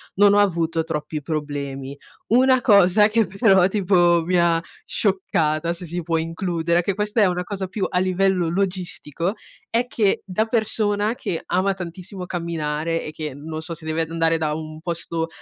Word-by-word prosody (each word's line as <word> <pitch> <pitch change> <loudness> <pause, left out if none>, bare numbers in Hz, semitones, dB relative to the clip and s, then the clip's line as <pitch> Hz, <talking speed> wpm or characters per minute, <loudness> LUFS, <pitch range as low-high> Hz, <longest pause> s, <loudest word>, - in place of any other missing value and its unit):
non 205 +1 +5
ho 205 - +5
avuto 165 -4 +1
troppi 155 -1 -4
problemi. 140 -3 -4 0.3
Una 255 +2 +4
cosa 205 -2 +5
che 225 0 +2
però 195 -3 +4
tipo 180 -4 +3
mi 180 +1 +1
ha 170 -1 +3 0.2
scioccata, 170 -5 0
se 175 +1 -7
si 175 +2 -4
può 165 0 0
includere, 170 +1 0
che 200 - 0
questa 210 +3 0
è - - +6
una 180 -1 0
cosa 195 -1 -4
più 190 +2 -2
a 180 - -1
livello 185 -1 +1
logistico, 180 -2 -2 0.4
è 240 +2 0
che 210 -5 +1
da 200 +3 0
persona 215 -1 0
che 165 - -4
ama 190 +2 +1
tantissimo 180 +1 -7
camminare, 165 -2 -2
e 155 - -6
che 155 -3 -6
non 155 +3 -6
so, 165 +1 -6
se 160 -1 -9
deve 160 +1 -1
andare 165 0 +1
da 155 -2 -1
un 155 0 -5
posto 170 -1 -3
175 Hz, 170 wpm, -22 LUFS, 160-195 Hz, 0.4 s, è